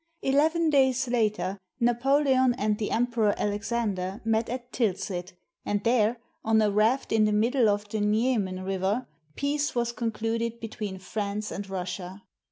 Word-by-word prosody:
Eleven 315 Hz, +4 st, +3 dB
days 265 Hz, -2 st, +3 dB
later, 210 Hz, -5 st, 0 dB, 0.2 s
Napoleon 260 Hz, +1 st, +3 dB
and 210 Hz, -1 st, 0 dB
the 210 Hz, -, -1 dB
Em 235 Hz, +2 st, +2 dB
peror 225 Hz, -4 st, +1 dB
Alexander 205 Hz, -2 st, -2 dB
met 225 Hz, 0 st, +1 dB
at 245 Hz, 0 st, -5 dB
Tilsit, 185 Hz, -5 st, -2 dB, 0.3 s
and 205 Hz, 0 st, -1 dB
there, 230 Hz, -1 st, +3 dB, 0.3 s
on 220 Hz, 0 st, +3 dB
a 210 Hz, -1 st, +3 dB
raft 220 Hz, +6 st, +2 dB
in 220 Hz, -1 st, +4 dB
the 210 Hz, -, +2 dB
middle 230 Hz, +2 st, +3 dB
of 205 Hz, 0 st, 0 dB
the 215 Hz, 0 st, -2 dB
Niemen 210 Hz, -3 st, +1 dB
River, 195 Hz, +5 st, -1 dB, 0.3 s
peace 290 Hz, +1 st, -1 dB
was 235 Hz, -1 st, 0 dB
concluded 230 Hz, 0 st, -2 dB
between 215 Hz, -4 st, -5 dB
France 205 Hz, +2 st, -4 dB
and 200 Hz, 0 st, -5 dB
Russia. 185 Hz, +1 st, -5 dB
220 Hz, 150 wpm, -27 LUFS, 205-245 Hz, 0.3 s, in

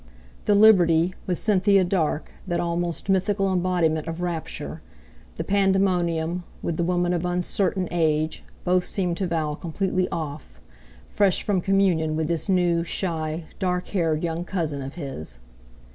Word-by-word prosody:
The 205 Hz, -, +4 dB
Liberty, 180 Hz, -5 st, +5 dB
with 180 Hz, -2 st, 0 dB
Cynthia 200 Hz, -2 st, +3 dB
Dark, 170 Hz, -4 st, -1 dB, 0.2 s
that 175 Hz, -1 st, 0 dB
almost 170 Hz, 0 st, -2 dB
mythical 195 Hz, 0 st, +1 dB
embodiment 175 Hz, -4 st, +1 dB
of 165 Hz, +1 st, -4 dB
rapture; 175 Hz, -2 st, -4 dB, 0.5 s
the -, -, -3 dB
Pandemonium, 180 Hz, -4 st, +1 dB, 0.2 s
with 165 Hz, -, -2 dB
the 170 Hz, -, +1 dB
woman 175 Hz, 0 st, +1 dB
of 175 Hz, -1 st, -1 dB
uncertain 180 Hz, +1 st, 0 dB
age—both 160 Hz, +2 st, 0 dB
seemed 180 Hz, -2 st, -2 dB
to 190 Hz, -, -1 dB
Val 155 Hz, -3 st, -1 dB
completely 185 Hz, +3 st, -1 dB
"off," 145 Hz, -, -6 dB, 0.5 s
fresh 200 Hz, -3 st, +2 dB
from 200 Hz, -4 st, +1 dB
communion 180 Hz, -5 st, +2 dB
with 160 Hz, 0 st, -1 dB
this 170 Hz, +3 st, -2 dB
new, 175 Hz, -3 st, +2 dB
shy, 165 Hz, -2 st, -2 dB, 0.2 s
dark 180 Hz, -1 st, -1 dB
haired 165 Hz, -5 st, 0 dB
young 165 Hz, 0 st, -2 dB
cousin 160 Hz, -6 st, -2 dB
of 135 Hz, +2 st, -7 dB
his. 135 Hz, -, -6 dB
175 Hz, 140 wpm, -24 LUFS, 160-185 Hz, 0.5 s, Liberty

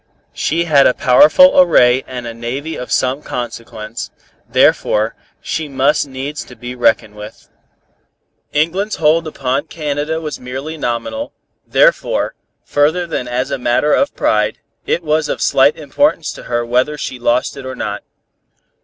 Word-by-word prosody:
She 165 Hz, +3 st, 0 dB
had 145 Hz, -5 st, +5 dB
a 125 Hz, -, +2 dB
powerful 155 Hz, -, +6 dB
array 130 Hz, -7 st, +4 dB
and 125 Hz, -2 st, -6 dB
a 115 Hz, -, -5 dB
navy 130 Hz, +7 st, -5 dB
of 125 Hz, -, -7 dB
some 130 Hz, +3 st, +1 dB
consequence, 115 Hz, -4 st, -6 dB, 0.4 s
therefore 110 Hz, +1 st, +2 dB, 0.3 s
she 160 Hz, -1 st, -3 dB
must 140 Hz, +2 st, +1 dB
needs 135 Hz, +2 st, -5 dB
to 125 Hz, -, -13 dB
be 125 Hz, 0 st, -7 dB
reckoned 110 Hz, -3 st, +1 dB
with. 105 Hz, 0 st, -11 dB, 1.0 s
England's 180 Hz, +8 st, 0 dB
hold 160 Hz, +1 st, +2 dB
upon 140 Hz, 0 st, -2 dB
Canada 150 Hz, 0 st, -3 dB
was 155 Hz, -2 st, -6 dB
merely 130 Hz, +5 st, -6 dB
nominal, 145 Hz, -, -3 dB, 0.3 s
therefore, -, -, +2 dB, 0.3 s
further 155 Hz, +5 st, +1 dB
than 130 Hz, -7 st, -4 dB
as 125 Hz, +3 st, -2 dB
a 135 Hz, -, -2 dB
matter 125 Hz, +5 st, +1 dB
of 280 Hz, +1 st, +1 dB
pride, -, -, +1 dB, 0.3 s
it 170 Hz, -, 0 dB
was 155 Hz, 0 st, 0 dB
of -, -, -2 dB
slight 135 Hz, +2 st, +3 dB
importance 160 Hz, -, 0 dB
to -, -, -11 dB
her 120 Hz, -1 st, -1 dB
whether 125 Hz, +5 st, 0 dB
she 130 Hz, -3 st, -5 dB
lost 120 Hz, +3 st, 0 dB
it 140 Hz, -, -8 dB
or 130 Hz, -, -5 dB
not. -, -, -4 dB
140 Hz, 150 wpm, -16 LUFS, 125-155 Hz, 1.0 s, powerful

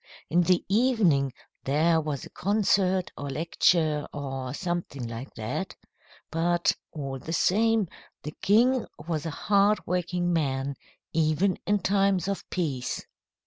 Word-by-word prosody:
In 175 Hz, +2 st, +4 dB
the 180 Hz, 0 st, +2 dB
evening 195 Hz, -, +3 dB, 0.3 s
there 160 Hz, +4 st, +3 dB
was 150 Hz, -3 st, -4 dB
a -, -, -13 dB
concert 190 Hz, -2 st, +1 dB
or 145 Hz, -, -5 dB
lecture, 155 Hz, 0 st, +2 dB
or 135 Hz, -3 st, -4 dB
something 170 Hz, -6 st, -3 dB
like 115 Hz, +3 st, -7 dB
that. 110 Hz, -1 st, -4 dB, 0.6 s
But, 170 Hz, +1 st, +2 dB, 0.2 s
all 135 Hz, -3 st, -5 dB
the 160 Hz, -, -6 dB
same, 220 Hz, +3 st, +3 dB, 0.4 s
the 150 Hz, -, -6 dB
king 240 Hz, +5 st, +3 dB, 0.2 s
was 160 Hz, -2 st, -2 dB
a 155 Hz, -, -5 dB
hardworking 180 Hz, -4 st, +2 dB
man, 140 Hz, -3 st, 0 dB, 0.4 s
even 160 Hz, +4 st, +2 dB
in 205 Hz, 0 st, +2 dB
times 195 Hz, -2 st, +2 dB
of 200 Hz, -1 st, -3 dB
peace." 145 Hz, -9 st, -2 dB
170 Hz, 125 wpm, -27 LUFS, 145-195 Hz, 0.6 s, In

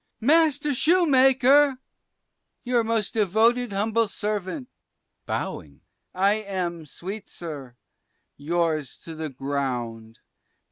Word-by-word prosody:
Master 295 Hz, +2 st, +3 dB
Shoe 340 Hz, +7 st, +3 dB
maker, 270 Hz, 0 st, +5 dB, 0.9 s
your 245 Hz, -2 st, +1 dB
most 225 Hz, -2 st, -1 dB
devoted 225 Hz, +3 st, +2 dB
humble 220 Hz, +3 st, +1 dB
servant 210 Hz, -, -4 dB, 0.6 s
(bowing), -, -, -5 dB, 0.3 s
I 195 Hz, +2 st, +3 dB
am, 175 Hz, -5 st, -4 dB
sweet 195 Hz, +8 st, -8 dB
sir, 145 Hz, -7 st, -8 dB, 0.6 s
yours 155 Hz, -2 st, -1 dB
to 165 Hz, -, -8 dB
the 160 Hz, -1 st, -5 dB
ground. 125 Hz, -5 st, -4 dB
205 Hz, 95 wpm, -25 LUFS, 160-250 Hz, 0.9 s, maker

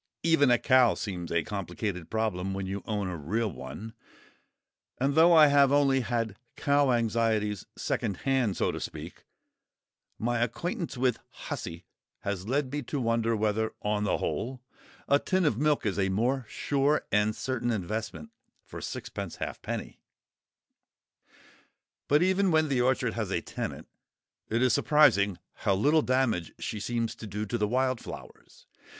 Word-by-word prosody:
Even 165 Hz, -5 st, +4 dB
a 120 Hz, -, +5 dB
cow 130 Hz, -2 st, +4 dB
seems 90 Hz, -5 st, -5 dB
a 85 Hz, -1 st, +1 dB
complicated 100 Hz, -3 st, -4 dB
problem 95 Hz, -4 st, -1 dB
when 95 Hz, 0 st, -3 dB
you 95 Hz, +1 st, -4 dB
own 105 Hz, -3 st, -1 dB
a 90 Hz, -, -3 dB
real 105 Hz, +8 st, -1 dB
one; 80 Hz, -, -8 dB, 1.0 s
and 135 Hz, +2 st, +1 dB
though 165 Hz, +3 st, +6 dB
I 160 Hz, -2 st, +8 dB
have 140 Hz, -2 st, +5 dB
only 140 Hz, -2 st, +4 dB
had 115 Hz, -4 st, -2 dB, 0.2 s
cow 140 Hz, -2 st, +3 dB
anxieties 110 Hz, -3 st, 0 dB
secondhand, 120 Hz, 0 st, -1 dB
so -, -, +1 dB
to -, -, -5 dB
speak, -, -, -8 dB, 0.9 s
my 120 Hz, +1 st, 0 dB
acquaintance 170 Hz, -, -2 dB
with 125 Hz, -2 st, +1 dB
"Hussy" 85 Hz, +1 st, -7 dB, 0.4 s
has 100 Hz, -1 st, -3 dB
led 135 Hz, +1 st, 0 dB
me 145 Hz, +1 st, -2 dB
to 140 Hz, +2 st, -4 dB
wonder 115 Hz, -1 st, +1 dB
whether, 110 Hz, +1 st, 0 dB
on 105 Hz, 0 st, 0 dB
the 105 Hz, -, +1 dB
whole, 130 Hz, +2 st, -3 dB, 0.5 s
a 140 Hz, -, +4 dB
tin 185 Hz, +2 st, +1 dB
of 115 Hz, -6 st, +1 dB
milk 150 Hz, -3 st, +2 dB
is 100 Hz, -1 st, 0 dB
a 95 Hz, -1 st, +2 dB
more 120 Hz, +5 st, 0 dB
sure 145 Hz, +1 st, +1 dB
and 105 Hz, +1 st, +2 dB
certain 120 Hz, -2 st, -2 dB
investment 105 Hz, -6 st, -3 dB, 0.3 s
for -, -, -9 dB
sixpence -, -, -5 dB
halfpenny. -, -, -5 dB, 2.1 s
But 150 Hz, +4 st, +4 dB
even 190 Hz, +1 st, +3 dB
when 155 Hz, -2 st, +3 dB
the 130 Hz, -3 st, +2 dB
orchard 130 Hz, -1 st, +1 dB
has -, -, -3 dB
a -, -, -1 dB
tenant, -, -, -6 dB, 0.6 s
it 115 Hz, +3 st, +1 dB
is 130 Hz, -, +4 dB
surprising 120 Hz, -, +4 dB, 0.2 s
how 100 Hz, -, +1 dB
little 150 Hz, +10 st, +4 dB
damage 130 Hz, -, 0 dB
she 105 Hz, -, -4 dB
seems 115 Hz, +1 st, -2 dB
to 110 Hz, -, -8 dB
do 105 Hz, +2 st, -3 dB
to 115 Hz, -, -3 dB
the 105 Hz, -, +2 dB
wild 130 Hz, +1 st, +1 dB
flowers. -, -, -11 dB
115 Hz, 155 wpm, -28 LUFS, 105-135 Hz, 2.1 s, I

